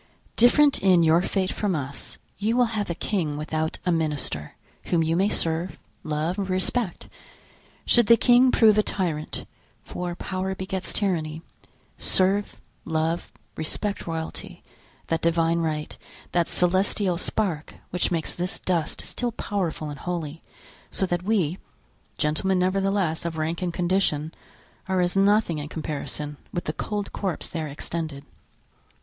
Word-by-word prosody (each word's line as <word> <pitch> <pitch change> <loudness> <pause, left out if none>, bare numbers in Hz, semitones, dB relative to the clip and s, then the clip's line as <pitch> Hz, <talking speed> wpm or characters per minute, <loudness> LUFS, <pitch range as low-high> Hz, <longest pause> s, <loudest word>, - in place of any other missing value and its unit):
Different 280 +5 +5
in 185 -3 +5
your 165 +2 +5
fate 190 0 0
from 200 -4 -1
us, 140 -2 -5 0.2
you 220 +4 +1
will 250 - +5
have 205 -3 -1
a 170 - -1
king 160 -8 -1
without 155 +1 -2
a 180 - +3
minister, 150 - -1 0.3
whom 170 -2 +2
you 160 +1 +1
may 195 +4 +3
serve, 165 +1 -1 0.3
love, 155 +4 -1
respect. 190 +2 0 0.8
Should 240 -3 +5
the 235 - +8
king 245 +3 +6
prove 215 -2 +6
a - - +7
tyrant, 170 -7 -2 0.4
for 175 -1 -4
power 190 +1 -3
begets 190 0 -4
tyranny, 165 -5 -1 0.6
serve, 195 +2 +3 0.2
love, 160 +1 -1 0.2
respect 200 +6 -2
royalty, 160 -1 -5 0.4
that 165 0 -1
Divine 165 0 +2
right, 155 -2 -2 0.4
that 170 -1 +2
celestial 185 0 +2
spark 180 -6 -2 0.2
which 180 - +2
makes 165 -3 -1
this 180 +1 -2
dust 170 -4 -1
still 245 -1 -3
powerful 175 -8 -2
and 145 - -8
holy, 165 -2 -4 0.5
so 190 - +1
that 175 -1 -1
we—gentlemen, 185 -2 -1
nevertheless, 185 -2 +1
of 170 -1 -3
rank 160 +3 -1
and 180 -1 0
condition—are 180 +1 -2
as 180 +1 +1
nothing 195 -4 +3
in 145 0 -5
comparison 150 -1 -4
with 175 - -2
the 155 - -2
cold 205 +2 -3
corpse 190 -4 -2
there 160 -2 -3
extended." 150 0 -5
175 Hz, 135 wpm, -25 LUFS, 160-195 Hz, 0.8 s, the